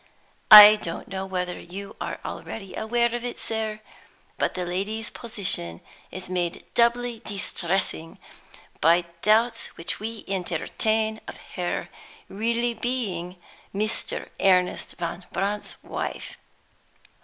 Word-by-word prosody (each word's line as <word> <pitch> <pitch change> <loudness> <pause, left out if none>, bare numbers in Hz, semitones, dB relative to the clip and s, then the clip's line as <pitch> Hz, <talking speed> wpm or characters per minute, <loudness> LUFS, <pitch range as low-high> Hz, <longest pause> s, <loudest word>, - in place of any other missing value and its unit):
I 210 0 +12
don't 170 -5 -6
know 190 0 -4
whether 180 -1 -3
you 195 +3 -8
are - - -4
already 195 -4 -7
aware 235 +1 +1
of 240 0 -3
it, 245 - -4
sir; 220 -1 -3 0.6
but - - 0
the 180 -1 -2
lady's 205 +5 -2
position 180 - -2 0.3
is 185 0 -6
made 175 -2 -2
doubly 235 0 +2
distressing 185 -4 -2 0.6
by 170 +2 +4 0.2
doubts 225 +2 +3
which 165 +1 -4
we 220 +1 -5
entertain 215 +4 -1
of - - -7 0.2
her 180 -3 -2 0.4
being - - -36
really 230 -4 -1 0.4
Mr. 215 +2 -1
Ernest 180 -2 +2
Van 175 +1 -4
Brandt's 205 +2 -2
wife. - - -5
200 Hz, 115 wpm, -25 LUFS, 180-225 Hz, 0.6 s, I